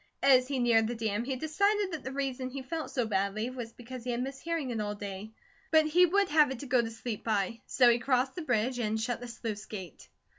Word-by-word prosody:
As 260 -2 +6
he 275 -1 -2
neared 230 -3 +4
the 240 - -3
dam, 220 0 -1
he 265 0 -2
decided 400 +8 +1
that 315 -4 -5
the 260 - -5
reason 265 -2 -3
he 265 +1 -6
felt 320 +3 -4
so 245 -3 0
badly 215 +3 -1
was 240 -3 -6
because 245 +1 -9
he 250 - -5
had 240 +1 -1
missed 270 +1 -6
hearing 330 -6 -2
it 225 -2 -2
all 210 0 -3
day, 205 0 -6 0.4
but 315 -1 +5
he 355 +4 +5
would 400 +3 +2
have 300 -2 +5
it 265 - -4
to - - -6
go 250 -2 +3
to 225 - -3
sleep 225 -1 -5
by. 220 0 -1
So 250 - +4
he 240 0 +5
crossed 260 0 +1
the 355 - -5
bridge 245 -3 0
and 220 -1 0
shut 240 +2 -2
the 245 - -6
sluice 225 -3 -5
gate. 190 -7 -9
250 Hz, 250 wpm, -30 LUFS, 225-275 Hz, 0.4 s, As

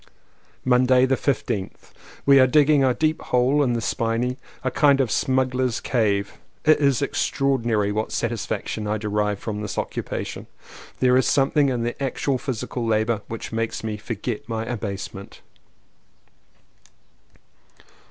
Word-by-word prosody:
Monday 125 0 +4
the 130 - +1
15th. 110 -8 -3 0.3
We 140 -1 +7
are 130 - +6
digging 145 +1 +4
a 130 - +4
deep 155 +4 0
hole 125 +4 +2
in 125 -4 +2
the 115 - -1
spinney 115 +3 -1
— - - -26
a 130 - 0
kind 140 +1 +4
of 130 -5 +1
smuggler's 130 -3 +1
cave. 100 -5 0 0.3
It 155 - +5
is 140 -1 +2
extraordinary 120 -8 0
what 110 +1 -2
satisfaction 110 -2 -3
I 105 +1 0
derive 105 -1 -1
from 105 0 -5
this 105 - -5
occupation. - - -4 0.5
There 125 0 +5
is 130 - +2
something 140 +1 +3
in 120 -3 -1
the 120 +3 -4
actual 135 0 -1
physical 125 -3 -4
labour 110 -1 +1
which 115 - -6
makes 115 0 -2
me 110 -1 -3
forget 110 +2 -5
my 110 0 -2
abasement. 100 -4 -6
125 Hz, 140 wpm, -23 LUFS, 110-135 Hz, 0.5 s, We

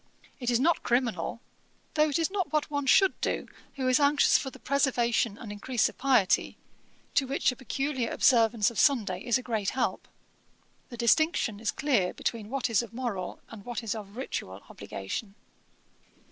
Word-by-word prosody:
It 245 -2 -2
is 240 -1 +2
not 330 +5 +2
criminal, 235 -4 -1 0.5
though 305 0 +3
it 285 - 0
is 330 +2 0
not 375 -7 -2
what 305 -1 0
one 285 -1 -2
should 385 +8 +4
do, - - -1 0.3
who 265 -2 -2
is 255 +1 +4
anxious 285 0 +4
for 270 - +2
the - - -13
preservation 240 -6 +1
and 220 -4 -8
increase 225 +4 0
of - - -15
piety, 255 -9 +2 0.6
to 270 - +2
which 275 0 +1
a - - -8
peculiar 265 -1 -2
observance 230 -3 +3
of 235 - -4
Sunday 210 -11 +2
is 240 -1 +2
a 255 - -7
great 220 -5 -1
help. - - -1 0.8
The 240 - -9
distinction 235 -2 +2
is 220 - -2
clear 245 -11 0
between 220 -3 -3
what 270 0 -1
is 230 -3 +2
of 230 -1 -10
moral 235 -7 -4
and 215 -3 -10
what 240 0 -5
is 220 - -2
of 210 -1 -9
ritual 95 - -5
obligation.' 195 - -6
245 Hz, 175 wpm, -28 LUFS, 220-275 Hz, 0.8 s, should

